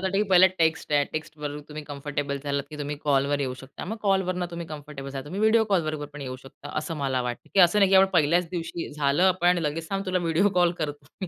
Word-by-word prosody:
तर 190 - -6
वाटतं, 195 - -1
की - - +3
पहिला 185 0 +8
टेक्स्ट 160 -2 +1
आहे. 145 -1 +4
टेक्स्टवर 150 -2 -5
तुम्ही 150 0 -7
कम्फर्टेबल 145 -1 -4
झालात 140 -1 -1
की 150 - -8
तुम्ही 145 0 -4
कॉलवर 140 0 +2
येऊ 130 -2 -2
शकता. 135 +1 -9
मग 220 +5 -4
कॉलवरनं 185 -3 +1
तुम्ही 170 -1 -6
कम्फर्टेबल 145 -3 -8
झालात, 135 0 -6
तुम्ही 185 +7 -5
व्हिडिओ 220 +1 +4
कॉल 185 -4 +3
बरोबर 155 -1 -3
पण 150 - -9
येऊ 130 -1 -5
शकता, 135 +2 -12
असं 160 +1 -4
मला 135 -3 -1
वाटतं. 120 -1 -5
की 195 - +6
असं 175 +4 +5
नाही 195 -1 +4
की 190 - +6
आपण 190 0 +7
पहिल्याच 165 +3 +2
दिवशी, 170 -1 -4
झालं, 145 +3 +1
आपण 180 -1 +3
लगेच, 160 +1 -3
"थांब 195 0 -2
तुला 185 0 +1
व्हिडिओ 170 +4 +2
कॉल 175 -1 +4
करतो 145 -2 -5
मी." 190 - -2
155 Hz, 245 wpm, -26 LUFS, 145-180 Hz, -, पहिला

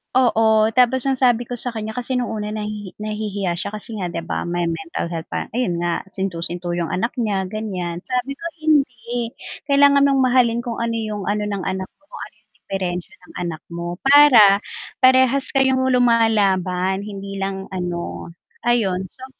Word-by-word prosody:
Oo, 220 -3 +4
tapos 250 +1 +4
ang 265 - +1
sabi 245 -2 +3
ko 245 - -4
sa 245 +1 -4
kanya 220 -1 -4
kasi 250 +1 -3
nung 250 -1 -1
una 210 -1 -4
nahi 210 -2 -5
nahihiya 205 -4 -3
siya 200 +3 -4
kasi 215 +1 -7
nga 185 - -3
'di 165 - -3
ba 165 - -3
may 175 -1 -1
mental 165 +1 -4
health 165 -1 -5
pa, - - -4
ayun 215 -8 -1
nga 175 +1 -1
sinto-sinto 175 -2 -4
yung 170 0 -2
anak 230 +8 -2
niya 195 -5 -1
ganyan 185 -6 -4
sabi 255 +2 -2
ko 335 - -10 0.2
hindi 245 -6 0 0.3
kailangan 280 0 +5
mong 275 -1 +3
mahalin 245 -2 +3
kung 235 -1 -5
ano 230 0 -1
yung 215 -3 -3
ano 210 0 -1
ng 200 -2 -3
anak 190 -1 -3
mo 295 - -36
kung 315 - -11
ano - - -39
yung 215 - -53
diperensiya 180 -2 -4
ng - - -17
anak 165 -3 -4
mo, 175 +1 -5
para 250 -9 +7 0.4
parehas 260 +1 +4
kayong 265 -1 +2
lumalaban 200 -6 +2
hindi 195 -1 -7
lang 195 0 -3
ano, 175 -2 -4 0.3
ayon 210 -7 +1
so 260 -1 -12
215 Hz, 175 wpm, -21 LUFS, 185-245 Hz, 0.4 s, para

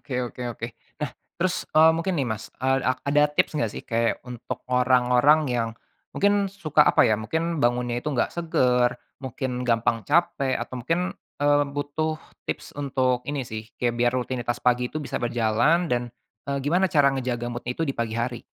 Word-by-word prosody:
oke 135 - -10 0.2
oke - - -13
oke. 115 - -5 0.3
Nah 150 -4 -2 0.3
terus, 180 +1 -1
eee, 160 +1 +8
mungkin 170 +3 -1
nih 140 -4 0
Mas, 110 -1 -4 0.2
eee, 135 0 +3
a 130 - +4 0.2
ada 145 +1 +4
tips 150 - +1
gak 115 - 0
sih - - -6
kayak 115 0 +1
untuk 125 0 -6
orang-orang 125 +3 +4
yang 120 -2 0 0.5
mungkin 200 0 +2
suka 155 -6 +2
apa - - +5
ya, 110 -3 +4
mungkin 160 +7 -2
bangunnya 120 0 +1
itu 150 - -3
nggak 120 - +1
seger, 125 -7 +2 0.3
mungkin 125 0 -3
gampang 115 0 +2
capek, 145 -5 +2
atau - - -6
mungkin, 165 +8 0 0.4
eee, 145 0 +4
butuh 150 +2 -2 0.3
tips - - -4
untuk 130 -3 0
ini 145 -3 -2
sih, 110 0 -7
kayak 120 -1 0
biar 120 0 +3
rutinitas 120 -1 -2
pagi 125 0 +3
itu 155 - -3
bisa 145 - -4
berjalan 120 +9 +2
dan, 120 -1 +1 0.5
eee, 140 0 0
gimana 180 +6 +2
cara 140 -4 +4
ngejaga 125 -2 -2
mood-nya 120 +1 -5
itu 165 - 0
di 135 - -2
pagi 115 -1 -2
hari? 120 0 -2
130 Hz, 180 wpm, -25 LUFS, 120-150 Hz, 0.5 s, eee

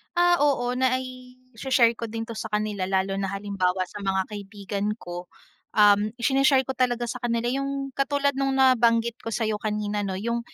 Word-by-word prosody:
Ah, 350 0 +4
oo, 270 -4 +2
nai-shi-share 255 -1 0
ko 230 - -3
din 225 +1 -4
'to 230 - -8
sa - - -4
kanila 210 -3 -2
lalo 195 0 0
na 195 - -1
halimbawa 195 -2 -1
sa 205 +3 -9
mga 190 -1 0
kaibigan 205 0 -5
ko. 175 -4 -8 0.5
Um, 205 0 +5
shi-ne-share 270 +2 +3
ko 265 - -4
talaga 245 -2 0
sa 245 +1 -4
kanila 240 0 -1
'yung 275 0 -3
katulad 280 +1 +1
nung 270 0 -1
nabanggit 235 -3 +3
ko - - -10
sa'yo 220 -2 -1
kanina, 210 -1 -2
'no, 190 - -3
'yung, 235 +4 -2
230 Hz, 170 wpm, -25 LUFS, 205-260 Hz, 0.5 s, Um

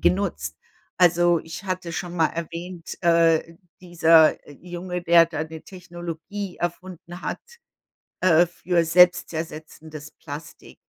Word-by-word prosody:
genutzt. 85 - 0 0.4
Also, 175 -1 +4
ich 165 +4 -9
hatte 185 -2 -4
schon 175 0 -5
mal 165 -2 +3
erwähnt, 170 +1 -7
äh, 165 -1 +3 0.2
dieser 165 -3 +4 0.3
Junge, 180 0 -5
der 170 -1 +6
da 160 -2 -4
‘ne 160 0 -9
Technologie 175 +1 -8
erfunden 175 0 -6
hat, - - -4 0.8
äh, 175 -1 +5
für 175 0 -1
selbstzersetzendes 160 -3 0
Plastik. 150 +1 -11
170 Hz, 110 wpm, -23 LUFS, 160-180 Hz, 0.8 s, der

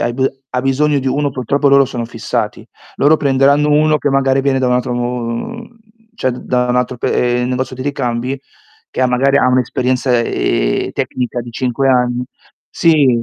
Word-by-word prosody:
hai 120 - 0
b 130 +2 -1 0.3
ha 125 - -1
bisogno 140 +2 +1
di 135 - -5
uno, 140 +2 0
purtroppo 140 +3 0
loro 140 0 +6
sono 120 -3 -4
fissati. 115 -1 -4 0.3
Loro 150 +3 +4
prenderanno 140 +1 +3
uno 155 +1 +3
che 145 - -1
magari 135 0 +2
viene 135 -1 +1
da 130 - 0
un 125 - +2
altro 125 0 0
mhmm, 125 - -4 0.4
cioè 130 - 0
d 125 - -7
da 125 0 +1
un 125 - +1
altro 125 0 -1
pe 120 +1 0
ehm, 125 - -1
negozio 130 0 -3
di 130 - -5
ricambi 130 -1 -2 0.5
che - - -4
ha - - +4
magari 135 +3 +2
ha 135 - +3
un'esperienza, 125 0 +1
ehm, - - 0
tecnica 125 -1 -3
di 120 - -9
5 130 +3 -1
anni 125 -1 +1 0.5
sì, 140 -8 +3
130 Hz, 185 wpm, -16 LUFS, 125-140 Hz, 0.5 s, loro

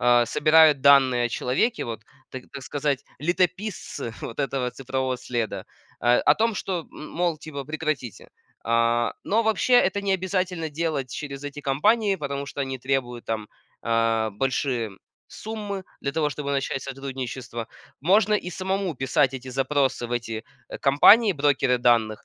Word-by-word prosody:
э, 120 -1 +5
собирают 155 +1 +5
данные 130 -3 +5
о - - -4
человеке 135 - 0
вот, 115 -2 -5 0.3
та 130 - -6
так 140 -1 -7
сказать, 140 -1 -2 0.2
летописцы 180 - -2
вот 115 - -5
этого 135 -2 -1
цифрового 130 -1 -2
следа, 115 -6 -3 0.3
э, 120 0 +4
о 145 - +4
том, 225 +2 +1
что, 180 -5 -3
мол, 165 +1 -3
типа, 140 -2 -7
прекратите. 155 -5 -4 0.4
А, 115 0 +2
но 225 +3 +2
вообще 220 +3 +2
это 200 -4 +4
не 195 -1 +1
обязательно 185 -3 -1
делать 150 -5 -3
через 140 -1 -6
эти 145 0 -6
компании, 195 +10 +2
потому 140 -3 -4
что 140 - -6
они 135 -1 -2
требуют 125 -2 -2
там, 110 -2 -3 0.3
а, 115 -1 +1
большие 125 0 -1 0.4
суммы 205 -3 -6 0.2
для 140 - -2
того, 150 +1 0
чтобы 145 0 -5
начать 135 -1 -1
сотрудничество. 130 -3 -6 0.3
Можно 200 +7 +4
и 180 -3 -2
самому 190 0 -2
писать 130 0 +2
эти 130 0 -7
запросы 135 -1 0
в 120 - -5
эти, 115 -2 -3 0.2
э, - - -7
компании 200 +11 +6
брокеры 140 -4 +2
данных 115 -3 +2
140 Hz, 150 wpm, -25 LUFS, 125-165 Hz, 0.4 s, компании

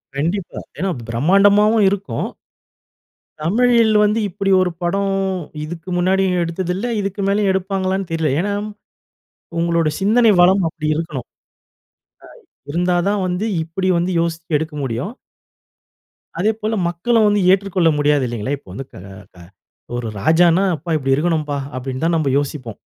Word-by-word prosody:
கண்டிப்பா. 170 +6 -2 0.2
ஏன்னா 190 0 -1 0.2
பிரமாண்டமாவும் 200 - +4
இருக்கும். 190 - -3 1.1
தமிழில் 230 +5 +3
வந்து 210 +2 +2
இப்பிடி 195 +1 -2
ஒரு 185 -1 +1
படம் 195 +3 0 0.5
இதுக்கு 165 +3 -8
முன்னாடியும் 185 +1 +2
எடுத்ததில்லை, 180 +6 -3
இதுக்கு 200 0 -3
மேலயும் 200 0 +2
எடுப்பாங்களான்னு 190 0 -1
தெரில. 160 -2 0
ஏன்னா 200 +3 -1 1.1
உங்களோட 170 -1 +1
சிந்தனை 220 +3 +4
வளம் 185 +2 +5
அப்படி 155 -1 -6
இருக்கணும். 150 -6 -4 1.2
அ - - -33
இருந்தா 175 +3 +1
தான் 205 -1 0
வந்து, 180 +3 -2 0.2
இப்படி 180 +4 -3
வந்து 175 +2 -1
யோசிச்சு 165 -1 -1
எடுக்க 160 0 -5
முடியும். 130 - -3 1.3
அதேபோல 215 +3 0
மக்களும் 215 +7 +1
வந்து 205 -1 +2
ஏற்றுக்கொள்ள 190 -3 +2
முடியாது 145 -2 +2
இல்லைங்களா? 120 +4 -3
இப்போ 130 - -19
வந்து 135 +7 -6
க - - -14 0.4
க - - -18 0.6
ஒரு 120 -1 -3
ராஜான்னா, 170 - +4
"அப்பா 165 +3 -6
இப்படி 135 -2 0
இருக்கணும்ப்பா" 155 -2 -1 0.2
அப்படின்னு 130 +2 -4
தான் 170 0 +2
நம்ப 155 -3 0
யோசிப்போம். 135 -6 -4
175 Hz, 130 wpm, -19 LUFS, 155-195 Hz, 1.3 s, வளம்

